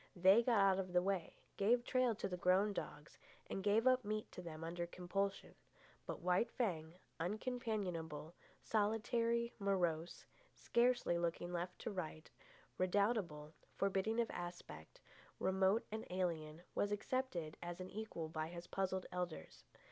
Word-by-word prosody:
They 190 +5 +7
got 235 -1 +3
out 195 -1 +5
of 185 -1 -3
the 180 - +5
way, 195 -3 -1 0.2
gave 235 +5 +4
trail 255 -3 +3
to - - -2
the 180 - -3
grown 185 +4 +3
dogs, 150 -5 -6 0.3
and 195 - -3
gave 210 +4 +3
up 255 -1 +5
meat 215 +1 -3
to - - -7
them 165 -2 -7
under 170 +1 -3
compulsion. 195 +3 -2 0.5
But - - -4
White 180 +6 +2
Fang, 170 -8 -2 0.2
uncompanionable, 180 - -2 0.3
solitary, 230 +2 +1
morose, 175 -4 0 0.3
scarcely 240 -7 +2
looking 170 0 -1
to - - -6
right 175 +1 -3
or 215 - -2
left, 155 -1 -6 0.5
redoubtable, 185 -6 +1 0.2
forbidding 195 +3 +1
of 235 - +1
aspect, 175 - -7 0.4
remote 190 +3 +3
and 220 +1 -3
alien, 170 -3 -2
was 205 - +1
accepted 205 - -1
as 175 0 -5
an 185 0 -6
equal 200 -6 -4
by 155 0 -3
his 170 +1 -7
puzzled 190 -1 -1
elders. 175 - -5
185 Hz, 145 wpm, -39 LUFS, 170-215 Hz, 0.5 s, They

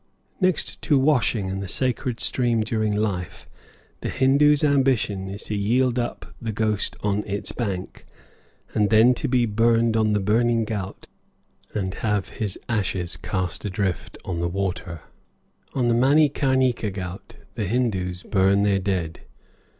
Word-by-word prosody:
Next 185 -4 0
to 145 - +3
washing 130 -7 +2
in 95 +1 -3
the 100 - -5
sacred 125 +2 -1
stream 120 -3 +1
during 110 -1 0
life, 100 -5 -3 0.5
the - - -4
Hindoo's 145 +3 +4
ambition 130 -9 +2
is 100 +1 -6
to 105 - -3
yield 120 +5 +1
up 120 - -5
the 115 -1 -2
ghost 110 -1 -1
on 105 0 0
its 100 0 -3
bank, 100 -6 -5 0.7
and 105 -1 +2
then 115 +3 +6
to 135 - -3
be 125 -2 +2
burned 115 +1 +2
on 110 -1 +2
the 105 - +2
Burning 115 +3 +2
Ghaut 100 -3 -5 0.7
and 95 -3 -1
have 105 -1 -1
his 105 -3 -4
ashes 95 -6 -1
cast 90 -3 -3
adrift 95 -2 -2
on 85 -2 -3
the 85 0 0
waters. 90 -3 -3 0.7
On 125 -3 +1
the 120 - +3
Manikarnika 130 -3 +3
ghaut 95 -1 -7 0.2
the 110 -3 -2
Hindoos 95 -5 -1
burn 100 0 +3
their 100 -1 +2
dead. 90 -4 -2
110 Hz, 145 wpm, -24 LUFS, 95-120 Hz, 0.7 s, then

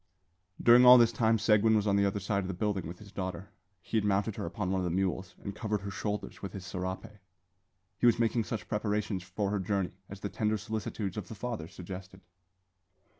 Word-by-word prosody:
During 120 +1 +7
all 125 0 +10
this 115 -1 +5
time 115 0 +2
Seguin 110 +1 +4
was 105 -1 +2
on 100 -2 +2
the 100 0 +3
other 100 +1 -1
side 100 0 0
of - - -4
the 95 - -4
building 100 -3 -1
with 85 +2 -7
his 100 0 -13
daughter. 95 -1 -5 0.3
He - - -1
had 110 - +2
mounted 100 +1 +1
her - - -4
upon 95 +1 -3
one 95 -1 +1
of - - -2
the 90 - 0
mules, 95 +1 -1
and 100 0 -5
covered 105 -2 -2
her 100 0 -5
shoulders 105 +1 -4
with 100 - -6
his 95 -2 -7
serape. 95 +1 -4 0.9
He 120 - +4
was 120 - +5
making 115 -1 +1
such 105 -6 -4
preparations 105 -2 -1
for 95 +3 -3
her 105 - 0
journey 95 -1 -1 0.2
as 100 -1 -9
the 100 - -3
tender 110 0 0
solicitudes 105 -2 -4
of 100 -4 -4
the 110 - -8
father 110 -6 -4
suggested. 95 +2 -9
100 Hz, 220 wpm, -30 LUFS, 95-110 Hz, 0.9 s, all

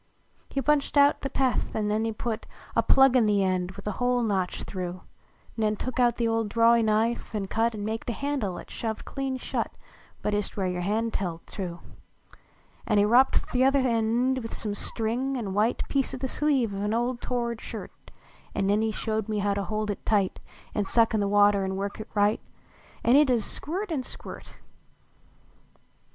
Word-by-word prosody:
He 275 - -2
punched 295 -1 +2
out 285 0 +5
the 275 - -2
peth, 265 -2 0
an 215 -1 0
nen 215 +2 +1
he 225 - 0
put 220 0 -4 0.3
A - - +5
plug 270 -1 +5
in 235 -4 +5
the 205 -1 +3
end 185 -1 0
with 200 - -11
a 210 - -1
hole 245 0 +2
notched 190 -5 -1
through; 180 -1 -5 0.5
Nen 215 -1 +1
took 255 +4 -4 0.2
the 235 - +1
old 225 -1 0
drawey 230 +2 +5
knife 220 +1 0
an 205 -2 -1
cut 225 +3 0
An 205 -1 -4
maked 225 +2 -3
a - - 0
handle 270 -9 -2
at - - -10
shoved 220 -2 -4
clean 270 -1 -3
shut - - -3 0.5
But 210 - 0
ist 205 0 -2
where 190 -2 0
ycr 180 -1 -2
hand 220 +5 -1
held 170 -4 -3
to. 175 -4 -5 1.1
An 210 - +2
he 205 - +5
wropt 245 +5 +3
th 250 +1 +3
uther 270 0 +4
end 235 +3 +1
with 225 -2 -6
some 210 -2 -2
string 240 +6 -2
an 205 -6 -3
white 215 +4 +1
Piece 275 -2 0
o - - -5
the 265 - -2
sleeve 265 -6 +1
of 195 +1 -3
a - - +1
old 240 +1 -1
tored 235 -2 -2
shirt; - - -7 0.6
An - - +1
nen 205 +2 +2
he 220 0 +1
showed 220 0 -2
me 210 -1 0
to 200 0 0
hold 215 -1 -2
it 200 - -7
tight, 200 -4 +1 0.3
An 205 -2 -1
suck 230 -1 +3
in 215 - +2
the 200 - +1
water 205 0 +4
an 190 0 -2
work 200 +2 -4
it 215 - -7
right 205 +1 +3 0.6
An 240 - +5
it 290 -1 +6
ud 250 - +5
ist 225 - -2
squirt 370 +6 -4
an 295 -5 0
squirt - - -10
220 Hz, 200 wpm, -27 LUFS, 205-250 Hz, 1.1 s, it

